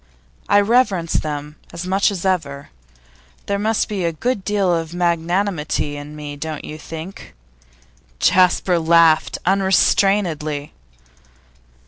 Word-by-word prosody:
I 205 - +6
reverence 200 -6 +1
them 150 0 -3
as 170 +2 -6
much 195 +3 +2
as 195 -3 -5
ever. 145 -7 -2 0.8
There 200 0 -1
must 220 +1 0
be 200 -4 -3
a 170 - +1
good 210 +5 -2
deal 200 -3 +1
of 165 0 -3
magnanimity 170 -3 -1
in 145 +1 -9
me, 145 -1 -7
don't 155 +1 -6
you 155 - -8
think?' 165 - -9 0.8
Jasper 180 - +3
laughed 165 -1 +4
unrestrainedly. 185 -5 +1
170 Hz, 115 wpm, -20 LUFS, 155-195 Hz, 0.8 s, I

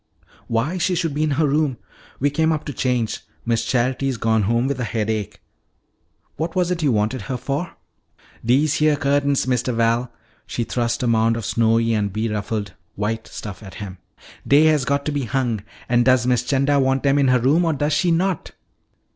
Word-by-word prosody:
"Why, 130 +11 -1
she 180 +1 +1
should 165 -3 -1
be 150 - -2
in 155 - +2
her 160 - +3
room. 145 -3 +1 0.4
We 145 +2 +1
came 160 +2 +2
up 155 -1 -2
to 145 - -5
change. 125 -3 -1 0.3
Miss 115 -1 +1
Charity's 130 +2 0
gone 110 0 +2
home 115 +4 +1
with 140 -2 -2
a - - -1
headache. 110 -3 -3 1.0
What 165 +2 -3
was 180 -1 +1
it 175 -1 -1
you 145 -4 +2
wanted 110 +3 0
her 130 - -1
for?" 140 +7 -4 0.7
"Dese 140 +5 +2
heah 155 -1 +3
cu'ta'ns, 140 -1 +1
Mistuh 125 -1 0
Val" 115 +1 +1 0.4
she 120 - -2
thrust 120 0 -1
a - - +1
mound 115 0 +2
of 115 - -5
snowy 115 +1 +2
and 105 -2 0
beruffled 105 -1 -3 0.2
white 110 +2 -3
stuff 100 -4 -8
at 95 -3 -11
him 95 -3 -8 0.5
"dey 145 +2 +6
has 155 -4 +3
got 140 0 0
to 150 - -1
be 145 -3 -2
hung. 120 -2 -1 0.3
An' 120 0 +3
does 130 -1 +3
Miss 125 -1 +2
'Chanda 140 +2 +1
wan' 135 0 +2
dem 140 +1 +2
in 140 - +3
her 125 0 +4
room 145 +8 +3
or 165 -2 +1
does 145 +1 0
she 175 +4 +2
not?" 175 +1 0
130 Hz, 195 wpm, -21 LUFS, 115-145 Hz, 1.0 s, dey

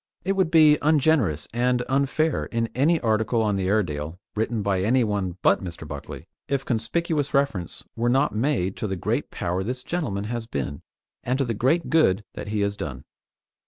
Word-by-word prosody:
It 195 - +1
would 190 -4 +2
be 155 -2 +6
ungenerous 145 - +2
and 125 +1 +1
unfair 140 +3 +1
in 115 -1 -1
any 155 +6 +3
article 110 0 +1
on 105 -2 +1
the 95 -1 -1
Airedale, 85 -6 -1 0.2
written 110 0 -1
by 100 -2 +1
anyone 105 -5 +1
but - - +4
Mr. 85 -3 -7
Buckley, 75 +1 -8 0.2
if 135 -1 -1
conspicuous 145 +6 -1
reference 135 - -1
were 120 +1 +1
not 135 +4 +2
made 105 -5 0
to 110 - -2
the 95 - -2
great 90 - -2
power 90 +2 -2
this 125 +4 -4
gentleman 130 - -2
has 115 +1 -4
been, 70 - -4 0.4
and 125 +2 0
to 135 - +1
the 115 - -1
great 135 +10 +1
good 110 - +4
that - - -7
he 105 0 -1
has 100 0 0
done. 70 -8 -6
115 Hz, 180 wpm, -25 LUFS, 95-140 Hz, 0.4 s, be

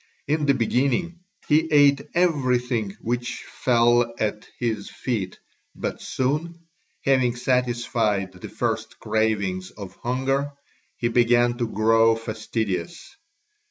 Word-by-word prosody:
In 150 0 +1
the 140 - +4
beginning 140 +8 0 0.3
he 160 +2 +3
ate 145 -1 +5
everything 125 - +1
which 120 +1 -3
fell 120 -1 +3
at 105 0 -2
his 110 -4 -2
feet, 105 -8 -3 0.4
but - - -4
soon, 165 +6 -2 0.4
having 130 -3 +3
satisfied 120 -6 0
the 90 -1 -10
first - - -3
cravings 100 -4 -1
of 100 -3 -10
hunger, 135 +3 -1 0.4
he 120 - 0
began 120 0 +3
to 120 - 0
grow 115 +1 +4
fastidious. 110 - -4
120 Hz, 110 wpm, -24 LUFS, 110-135 Hz, 0.4 s, ate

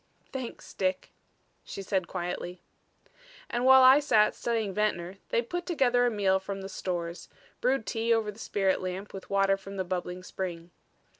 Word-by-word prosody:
"Thanks 260 -3 -7
Dick," 185 -1 -1 0.5
she 195 - -7
said 190 -2 -1
quietly. 180 0 -5 0.9
And 240 +1 0
while 265 0 +8
I 260 +2 +9
sat 215 -8 +4
studying 225 -4 -1
Ventnor, 190 -3 -1
they 235 - +1
put 350 +9 -4
together 245 -8 +3
a - - +3
meal 195 -4 +2
from 195 +1 -5
the 195 - -6
stores, 175 -3 -4 0.3
brewed 255 -2 +1
tea 230 +1 -1
over 225 -2 +2
the 210 - -16
spirit 195 -3 0
lamp 185 +2 -5
with 195 - -9
water 195 0 +3
from 195 0 -9
the 190 - 0
bubbling 180 0 -4
spring. 175 -2 -5
195 Hz, 165 wpm, -29 LUFS, 185-235 Hz, 0.9 s, I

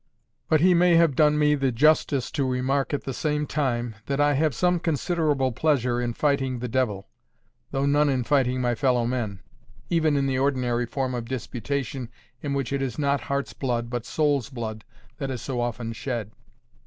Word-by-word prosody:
But 155 -2 +4
he 180 +1 +6
may 175 0 +5
have 165 -4 +4
done 150 +1 +4
me 150 0 +4
the 135 -3 +1
justice 140 0 +2
to 145 -4 -1
remark 130 +2 0
at 145 - -2
the 135 - -4
same 150 +2 -1
time, 120 -5 -1
that 140 0 -1
I 145 0 +4
have 150 -1 +1
some 180 +3 +2
considerable 155 -4 0
pleasure 125 -2 +1
in 120 -1 -2
fighting 135 -3 +1
the 125 +1 -4
devil, 110 -6 -1 0.6
though 135 +1 -1
none 145 +1 +3
in 130 -2 +1
fighting 130 -1 +1
my 120 -1 +1
fellow 125 -1 +1
man, 115 -6 -3 0.5
even 160 -3 +2
in 140 - +1
the 130 -1 0
ordinary 125 -3 0
form 130 +1 -2
of 120 -2 -3
disputation 130 0 -3 0.3
in 140 -1 -2
which 135 -1 -2
it 140 - 0
is 130 -4 -3
not 140 -3 +1
heart's 140 +5 -3
blood, 120 -3 -2
but 120 -2 -2
soul's 145 -6 +1
blood, 110 -4 -6 0.3
that 135 - -3
is 130 -3 -4
so 125 -3 -2
often 115 -1 -3
shed. 115 -3 -4
135 Hz, 190 wpm, -25 LUFS, 120-145 Hz, 0.6 s, he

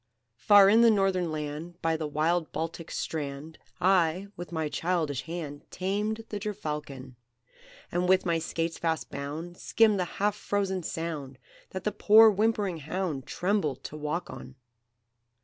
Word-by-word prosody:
"Far 200 - +7
in 220 +4 +6
the 235 - +7
Northern 190 -5 +2
Land, 155 +3 -5
By 165 0 +2
the 155 -1 -3
wild 160 +3 0
Baltic's 165 0 -4
strand, 150 0 -5 0.2
I, 185 +1 +2
with 175 +1 -8
my 160 -2 -1
childish 155 -4 -1
hand, 160 -4 -6
Tamed 210 +4 -2
the 205 - -4
gerfalcon; 150 - -5 0.7
And, 180 +1 0
with 190 0 +4
my 170 -2 +1
skates 165 0 -3
fast 160 -2 -2
bound, 155 +5 -6
Skimmed 215 -3 +3
the 180 - +1
half 205 +1 +1
frozen 195 -3 -1
Sound, 155 -6 -5 0.3
That 185 -1 -6
the 210 - 0
poor 220 +2 +7
whimpering 205 -3 0
hound 155 -3 -3
Trembled 185 -6 -1
to - - -7
walk 155 +4 -3
on. 130 - -10
170 Hz, 150 wpm, -28 LUFS, 155-195 Hz, 0.7 s, Far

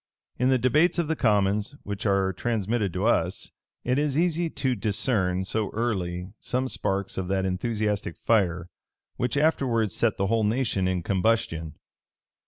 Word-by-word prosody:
In 125 - +3
the 130 - +4
debates 150 +10 +3
of 170 -3 0
the 160 - 0
commons, 105 0 +1
which 100 +2 -4
are 95 -1 +2
transmitted 110 0 -1
to 95 +3 -1
us, 95 -5 0 0.3
it 125 +3 +1
is 145 -1 0
easy 170 0 +1
to 130 -4 -1
discern 100 -3 0
so 105 +2 -1
early 95 -5 -2
some 130 +1 -1
sparks 95 -6 -2
of 90 - -3
that 95 0 0
enthusiastic 105 -1 -1
fire 90 -6 +1 0.5
which 125 +2 -1
afterwards 125 - +1
set 115 -2 +1
the 100 - +1
whole 110 +2 +1
nation 105 -4 +1
in 90 -2 -1
combustion. 95 -5 0
105 Hz, 155 wpm, -26 LUFS, 95-125 Hz, 0.5 s, the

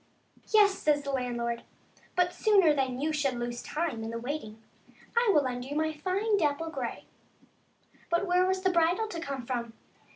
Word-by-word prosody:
Yes," 410 -3 +5
says 295 -1 +2
the 280 - -3
landlord, 240 -2 -2 0.3
" - - -30
but 360 0 +2
sooner 390 -8 +4
than 260 -3 -1
you 310 +3 0
should 280 -4 0
lose 240 0 -4
time 305 -8 -3
in 225 - -4
the 230 - -4
waiting, 230 -3 -5 0.6
I 470 -1 +3
will 295 -6 +4
lend 245 -1 -3
you 280 +3 -6
my 315 +1 0
fine 390 +7 0
dapple 320 +1 0
grey." - - -5 1.0
But 340 +3 +1
where 360 0 +3
was 375 0 0
the 375 - +3
bridle 350 +5 +2
to 340 - -5
come 275 -6 -5
from 235 -2 -3
300 Hz, 185 wpm, -29 LUFS, 250-360 Hz, 1.0 s, Yes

